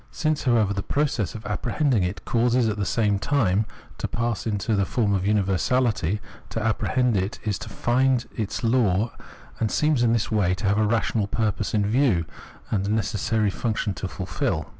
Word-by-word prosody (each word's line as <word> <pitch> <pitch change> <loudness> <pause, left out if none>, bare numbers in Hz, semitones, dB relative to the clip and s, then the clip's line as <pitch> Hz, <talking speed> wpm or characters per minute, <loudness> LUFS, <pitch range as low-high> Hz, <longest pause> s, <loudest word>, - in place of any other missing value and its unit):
Since, 155 -2 -1
however, 110 -5 +3
the 100 - -2
process 115 - -1
of 110 - -8
apprehending 125 +2 0
it 90 +2 -3
causes 120 0 +2
it - - +1
at 105 - -4
the 100 -2 -1
same 105 -4 +1
time 105 -4 +1 0.3
to - - -1
pass 115 -1 -2
into 105 +1 0
the 100 - +2
form 105 0 0
of 95 -1 0
universahty, 105 0 +1 0.3
to - - -3
apprehend 115 +2 +1
it 95 +5 -1
is 105 -4 -1
to 110 +1 -7
find 125 +3 +1
its 110 0 -3
law, 115 -3 +2 0.5
and 110 - +1
seems 150 -1 +2
in 120 -1 +3
this 115 -1 0
way 100 -4 +2
to 100 - -5
have 100 +2 +2
a 110 - +3
rational 110 -1 +1
purpose 110 -1 -1
in 105 -1 +2
view, 110 - +2 0.5
and 100 -2 0
a - - 0
necessary 110 0 0
function 110 -2 -1
to 95 - -4
fulfil. 90 -4 -2
110 Hz, 185 wpm, -24 LUFS, 100-120 Hz, 0.5 s, however